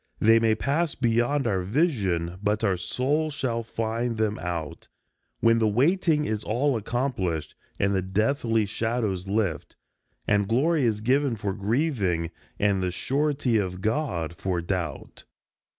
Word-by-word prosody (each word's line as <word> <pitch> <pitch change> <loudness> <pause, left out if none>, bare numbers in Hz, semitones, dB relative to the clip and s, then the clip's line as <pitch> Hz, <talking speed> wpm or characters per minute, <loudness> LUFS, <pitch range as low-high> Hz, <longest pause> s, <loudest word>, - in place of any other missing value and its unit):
They 115 +1 +6
may 115 -1 +3
pass 145 +7 0
beyond 120 +3 +1
our 95 -5 +1
vision, 95 - 0
but 105 +1 0
our 100 -4 +3
souls 145 - -1
shall 115 -4 -1
find 115 +1 -2
them 110 -1 0
out, 85 -3 -5 0.5
When 115 0 +4
the 110 - +3
waiting 150 - +2
is 110 -3 -2
all 130 +5 +1
accomplished, 105 - -2 0.3
and 100 0 +2
the 95 - +1
deathly 110 +3 +1
shadows 105 -3 -2
lift, 100 -5 -1 0.5
And 100 -1 +2
glory 140 +6 +2
is 105 -2 0
given 130 +2 +2
for 100 -2 -3
grieving, 100 - 0 0.3
and 100 -2 +2
the 90 - 0
surety 135 +5 0
of 90 -2 -3
God 105 - -1
for 90 0 -2
doubt. 85 -4 -4
110 Hz, 140 wpm, -26 LUFS, 95-130 Hz, 0.5 s, They